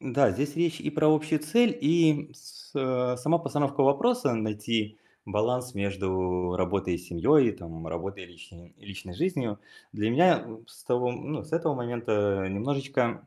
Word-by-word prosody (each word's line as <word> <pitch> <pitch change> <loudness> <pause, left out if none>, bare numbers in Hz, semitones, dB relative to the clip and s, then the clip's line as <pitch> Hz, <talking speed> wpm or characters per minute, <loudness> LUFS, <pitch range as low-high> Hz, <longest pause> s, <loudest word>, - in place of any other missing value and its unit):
Да, 135 +1 +3
здесь 145 +2 -2
речь 165 -1 0
и 150 - -3
про 155 0 +3
общую 155 0 0
цель, 230 +11 +2
и 155 -1 +3
с 150 - -15
а, 125 -2 0
сама 155 +7 +2
постановка 145 -3 0
вопроса: 140 - +3
найти 110 0 -2 0.3
баланс 125 +4 -1
между 95 -2 -1
работой 90 -1 0
и - - -8
семьей, 120 - +3
и 110 - -1
там 80 -3 -9
работой 95 +4 -5
и - - -14
личной 85 0 -16
и - - -21
личной 95 -2 -9
жизнью. 130 - -2 0.3
Для 105 +2 -1
меня 175 +7 +4
в 110 0 -13
с - - -17
того 125 0 +1
ну, 150 +5 -5
с 155 - -17
этого 165 -3 +1
момента, 110 -5 -1
э, - - -3
немножечко 130 +3 -1
125 Hz, 170 wpm, -27 LUFS, 100-145 Hz, 0.3 s, меня